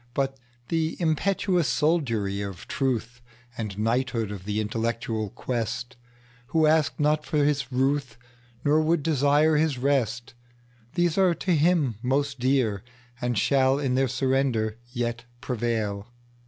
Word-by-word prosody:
But 135 Hz, -1 st, -1 dB, 0.3 s
the 165 Hz, -1 st, 0 dB
impetuous 175 Hz, 0 st, +1 dB
soldiery 115 Hz, -11 st, +1 dB
of 100 Hz, -3 st, -7 dB
truth, 125 Hz, -3 st, -2 dB, 0.3 s
And 105 Hz, -5 st, -5 dB
knighthood 115 Hz, 0 st, 0 dB
of 100 Hz, -2 st, -7 dB
the 105 Hz, +1 st, -1 dB
intellectual 115 Hz, 0 st, -2 dB
quest, 120 Hz, +2 st, -4 dB, 0.5 s
Who 160 Hz, +2 st, +2 dB
ask 155 Hz, 0 st, +2 dB
not 150 Hz, +1 st, +2 dB
for 150 Hz, -2 st, +1 dB
his 145 Hz, -2 st, +1 dB
ruthNor 125 Hz, +1 st, -1 dB
would 160 Hz, -1 st, +1 dB
desire 150 Hz, +1 st, +3 dB
his 150 Hz, -3 st, +1 dB
rest:These 120 Hz, -, -2 dB
are 185 Hz, -3 st, +4 dB
to 175 Hz, +2 st, 0 dB
him 150 Hz, -, +2 dB
most 135 Hz, +2 st, 0 dB
dear, 125 Hz, -6 st, +1 dB, 0.4 s
And 120 Hz, -2 st, -1 dB
shall 135 Hz, +4 st, +3 dB
in 135 Hz, -3 st, 0 dB
their 135 Hz, +1 st, +2 dB
surrender 130 Hz, -4 st, 0 dB
yet 120 Hz, -1 st, -3 dB
prevail. 115 Hz, -4 st, -2 dB
130 Hz, 125 wpm, -26 LUFS, 115-150 Hz, 0.5 s, are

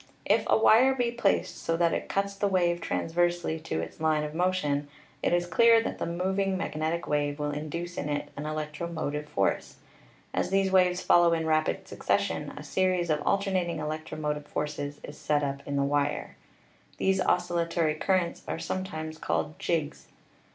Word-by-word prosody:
If -, -, +3 dB
a -, -, +4 dB
wire 240 Hz, +4 st, +6 dB
be 245 Hz, -2 st, 0 dB
placed 235 Hz, -4 st, 0 dB
so 165 Hz, -, 0 dB
that 170 Hz, -1 st, +2 dB
it -, -, -3 dB
cuts 200 Hz, 0 st, 0 dB
the 200 Hz, +1 st, 0 dB
wave 175 Hz, -3 st, +1 dB
transversely 175 Hz, -1 st, 0 dB
to 155 Hz, -, -3 dB
its -, -, -8 dB
line 155 Hz, -1 st, +2 dB
of 150 Hz, 0 st, -5 dB
motion, 160 Hz, -5 st, 0 dB, 0.3 s
it -, -, +1 dB
is 175 Hz, 0 st, +2 dB
clear 230 Hz, +5 st, +5 dB
that -, -, -4 dB
the -, -, -1 dB
mov 185 Hz, +3 st, -1 dB
ing 195 Hz, -1 st, +1 dB
magnetic 160 Hz, 0 st, -2 dB
wave 145 Hz, -1 st, 0 dB
will 150 Hz, -1 st, -2 dB
induce 170 Hz, +4 st, -4 dB
in 150 Hz, -, -3 dB
it 145 Hz, 0 st, -2 dB
an 145 Hz, +2 st, -5 dB
electromotive 155 Hz, -1 st, -4 dB
force. 100 Hz, -, 0 dB, 0.6 s
As -, -, 0 dB
these 195 Hz, 0 st, +2 dB
waves 180 Hz, -1 st, +3 dB
follow 175 Hz, -1 st, +5 dB
in 160 Hz, -1 st, 0 dB
rapid 155 Hz, 0 st, +1 dB
succession, -, -, -1 dB
a -, -, -7 dB
series 185 Hz, -3 st, +1 dB
of 150 Hz, -1 st, +1 dB
al -, -, +4 dB
ternating 185 Hz, -4 st, -1 dB
electromotive 150 Hz, -1 st, -4 dB
forces 145 Hz, -1 st, -4 dB
is 145 Hz, -, -9 dB
set 150 Hz, -1 st, +1 dB
up 140 Hz, 0 st, -2 dB
in 140 Hz, -, -2 dB
the 140 Hz, -, +2 dB
wire. 145 Hz, +1 st, -1 dB, 0.6 s
These 190 Hz, 0 st, +2 dB
oscillatory 170 Hz, -2 st, +1 dB
currents 175 Hz, +2 st, 0 dB
are -, -, -2 dB
sometimes 160 Hz, -4 st, -4 dB
called 155 Hz, +1 st, -2 dB
"jigs." 155 Hz, -3 st, -2 dB
165 Hz, 175 wpm, -28 LUFS, 150-185 Hz, 0.6 s, wire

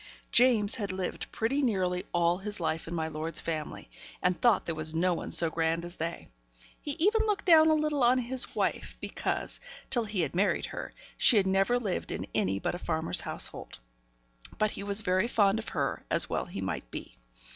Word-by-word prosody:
James 235 Hz, -4 st, +6 dB
had 200 Hz, -3 st, -3 dB
lived 185 Hz, -1 st, -5 dB
pretty 265 Hz, +6 st, -1 dB
nearly 185 Hz, -7 st, 0 dB
all 175 Hz, +1 st, +1 dB
his 205 Hz, 0 st, -3 dB
life 160 Hz, -1 st, -2 dB
in 170 Hz, -, -5 dB
my 160 Hz, -1 st, -2 dB
lord's 160 Hz, +1 st, -3 dB
family, 155 Hz, -2 st, -5 dB, 0.3 s
and 180 Hz, -1 st, 0 dB
thought 240 Hz, -3 st, +3 dB
there 165 Hz, -, -2 dB
was 155 Hz, 0 st, -4 dB
no 180 Hz, +2 st, +2 dB
one 165 Hz, -, -5 dB
so 170 Hz, -, +4 dB
grand 165 Hz, +1 st, -1 dB
as 175 Hz, +1 st, -9 dB
they. 165 Hz, +1 st, -5 dB, 0.5 s
He 290 Hz, -, -4 dB
even 410 Hz, +8 st, +2 dB
looked 410 Hz, -2 st, -1 dB
down 320 Hz, -3 st, +7 dB
a 315 Hz, -, +4 dB
little 305 Hz, -2 st, 0 dB
on 245 Hz, +2 st, +5 dB
his 255 Hz, +1 st, +1 dB
wife; -, -, -2 dB
because, -, -, -4 dB, 0.3 s
till 240 Hz, -3 st, +2 dB
he 205 Hz, -3 st, -2 dB
had 150 Hz, -3 st, -2 dB
married 190 Hz, +4 st, +1 dB
her, -, -, -7 dB, 0.3 s
she 230 Hz, -, +6 dB
had 195 Hz, -, +3 dB
never 195 Hz, +5 st, +2 dB
lived 205 Hz, -7 st, -3 dB
in -, -, -4 dB
any 95 Hz, +1 st, 0 dB
but 100 Hz, -, -2 dB
a 175 Hz, -, -5 dB
farmer's 160 Hz, -1 st, 0 dB
household. -, -, -3 dB, 0.8 s
But 215 Hz, 0 st, +1 dB
he -, -, -7 dB
was 200 Hz, +1 st, 0 dB
very 185 Hz, +2 st, +1 dB
fond 205 Hz, -2 st, +2 dB
of 220 Hz, -, -6 dB
her, 140 Hz, -4 st, -2 dB
as -, -, +2 dB
well -, -, -2 dB
he -, -, -7 dB
might -, -, -4 dB
be. -, -, -9 dB
190 Hz, 200 wpm, -29 LUFS, 165-240 Hz, 0.8 s, down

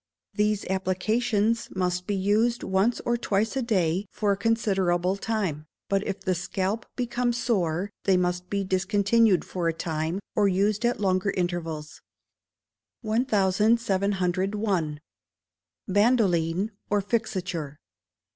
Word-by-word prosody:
These 210 Hz, -1 st, +1 dB
applications 210 Hz, +4 st, 0 dB
must 180 Hz, -1 st, -1 dB
be 205 Hz, -, 0 dB
used 215 Hz, +5 st, +1 dB
once 195 Hz, +5 st, +1 dB
or 240 Hz, 0 st, 0 dB
twice 215 Hz, +1 st, 0 dB
a 265 Hz, -, 0 dB
day 190 Hz, -5 st, 0 dB
for 210 Hz, -2 st, 0 dB
a -, -, +2 dB
considerable 195 Hz, -4 st, +1 dB
time; 195 Hz, -8 st, -2 dB, 0.2 s
but 195 Hz, 0 st, +1 dB
if 195 Hz, 0 st, -3 dB
the 185 Hz, -, 0 dB
scalp 190 Hz, +5 st, -2 dB
become 245 Hz, 0 st, 0 dB
sore, 200 Hz, -6 st, 0 dB
they 190 Hz, -2 st, +4 dB
must 180 Hz, 0 st, -1 dB
be 200 Hz, -1 st, -1 dB
discontinued 200 Hz, +2 st, +2 dB
for 175 Hz, -2 st, -2 dB
a 165 Hz, -, +1 dB
time, 160 Hz, +2 st, -2 dB, 0.2 s
or 205 Hz, -1 st, +4 dB
used 200 Hz, +4 st, +1 dB
at 240 Hz, -, -1 dB
longer 190 Hz, -1 st, +1 dB
intervals. 165 Hz, -5 st, -3 dB, 1.0 s
1701. 200 Hz, -, +1 dB, 0.9 s
Bandoline 200 Hz, -3 st, +2 dB, 0.2 s
or 205 Hz, -, +2 dB
Fixature. 185 Hz, -8 st, -2 dB
195 Hz, 120 wpm, -26 LUFS, 180-215 Hz, 1.0 s, they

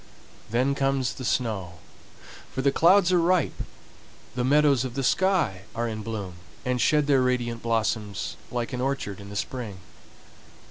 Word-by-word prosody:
Then 125 Hz, +5 st, +2 dB
comes 135 Hz, -4 st, 0 dB
the 130 Hz, -, -8 dB
snow, 110 Hz, -8 st, -1 dB, 0.8 s
for 130 Hz, -, -3 dB
the 140 Hz, -, +4 dB
clouds 180 Hz, +4 st, +5 dB
are 180 Hz, -, +4 dB
ripe, 175 Hz, -2 st, +1 dB, 0.7 s
the 125 Hz, -, -1 dB
meadows 140 Hz, -1 st, +4 dB
of 130 Hz, -2 st, -5 dB
the 135 Hz, -, -1 dB
sky 175 Hz, -, +2 dB
are 120 Hz, +1 st, -1 dB
in 110 Hz, -1 st, -4 dB
bloom, 105 Hz, -5 st, -5 dB, 0.3 s
and 125 Hz, -1 st, 0 dB
shed 150 Hz, -1 st, +3 dB
their 140 Hz, -2 st, +4 dB
radiant 120 Hz, -2 st, 0 dB
blossoms 105 Hz, -7 st, -1 dB
like 120 Hz, +1 st, -3 dB
an 125 Hz, -, -2 dB
orchard 130 Hz, -7 st, -2 dB
in 100 Hz, 0 st, -10 dB
the 100 Hz, -, -8 dB
spring. 110 Hz, -2 st, -4 dB
125 Hz, 155 wpm, -26 LUFS, 110-140 Hz, 0.8 s, clouds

